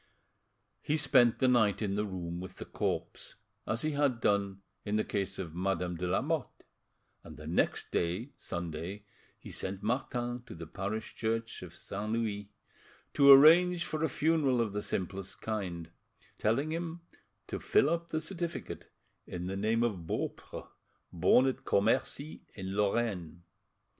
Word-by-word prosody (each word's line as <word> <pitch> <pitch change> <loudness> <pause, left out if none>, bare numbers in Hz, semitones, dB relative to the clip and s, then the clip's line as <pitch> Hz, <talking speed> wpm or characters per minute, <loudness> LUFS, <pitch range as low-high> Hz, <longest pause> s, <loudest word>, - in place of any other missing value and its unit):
He 150 - 0
spent 125 -6 +5
the 130 - +3
night 110 -5 +4
in 100 -3 -1
the 105 +1 0
room 85 -2 -5
with 95 0 -8
the - - -7
corpse, - - -3 0.3
as 110 +5 -1
he 155 - +1
had 140 -4 +1
done 100 -3 +1 0.2
in 105 0 -1
the 110 - +2
case 100 -1 -2
of 85 -4 -5
Madame 90 0 -1
de 90 +2 -3
Lamotte, 140 - -1 0.6
and 80 -3 -11
the 75 - -10
next 80 +3 0
day, 90 +11 -1
Sunday, 85 +4 -5 0.3
he - - -11
sent 95 +1 -4
Martin 120 +1 -1
to - - -8
the 85 0 -7
parish 100 +6 -4
church 115 0 -2
of 90 -2 -9
St. 105 +4 -4
Louis, 105 -3 -2 0.6
to 140 0 +8
arrange 170 +5 +8
for 155 0 -2
a 160 - +2
funeral 145 -3 +2
of 110 -4 0
the 105 - -1
simplest 95 0 -4
kind; 90 -7 -4 0.5
telling 135 +8 +1
him 170 +1 -4 0.4
to - - -4
fill - - +3
up 170 +1 -1
the 155 - 0
certificate 170 +1 -5 0.4
in 90 0 -5
the 95 +1 -3
name 110 +4 +1
of 95 -8 -2
Beaupre, - - -4 0.5
born 90 +9 +5
at 130 - -1
Commercy, 125 +8 0
in 95 -1 -5
Lorraine. 100 -5 -1
105 Hz, 155 wpm, -31 LUFS, 95-135 Hz, 0.6 s, to